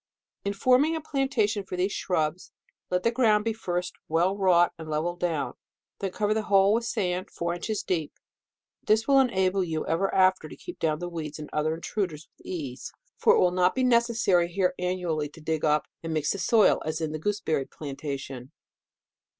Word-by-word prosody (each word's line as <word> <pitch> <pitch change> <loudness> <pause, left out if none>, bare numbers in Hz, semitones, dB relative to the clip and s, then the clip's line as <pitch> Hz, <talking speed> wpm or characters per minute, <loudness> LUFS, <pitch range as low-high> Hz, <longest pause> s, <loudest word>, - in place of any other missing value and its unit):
In 200 - -1
forming 255 +9 +3
a - - -2
plantation 265 -9 0
for 185 - -6
these 185 +3 +1
shrubs, 160 -2 -2 0.4
let 180 0 0
the 230 - +3
ground 220 -4 +3
be 225 - +1
first 180 -4 -3
well 175 +5 +2
wrought 180 -3 +4
and 160 -1 -8
levelled 165 +3 -2
down, 155 -8 -1 0.5
then 195 - -2
cover 210 +2 0
the 220 - 0
whole 195 0 +5
with 230 +1 0
sand, 185 -5 -2
four 170 0 -3
inches 205 +5 -3
deep. 160 -5 -1 0.7
This 220 +1 +2
will 275 -1 +6
enable 190 -7 +2
you 160 -3 -3
ever 185 +4 0
after 185 -4 +3
to - - -9
keep 355 - -10
down 155 -2 +1
the 175 +2 -5
weeds 155 -3 -5
and 150 -1 -9
other 155 +1 0
intruders 170 -3 -4
with - - -18
ease; 140 -8 -5 0.3
for - - +5
it - - +3
will 180 -1 +3
riot 180 0 +3
be 260 - +1
necessary 235 -7 +3
here 185 0 +1
annually 180 -5 -1
to 150 - -15
dig 160 0 -2
up 150 0 +2 0.2
and 165 -1 -3
mix 150 -1 +1
the 200 - -3
soil, 220 0 +4
as 155 0 -3
in 160 -2 -2
the 155 - -4
gooseberry 160 -6 -1
plantation. 135 -3 -6
180 Hz, 190 wpm, -27 LUFS, 160-210 Hz, 0.7 s, will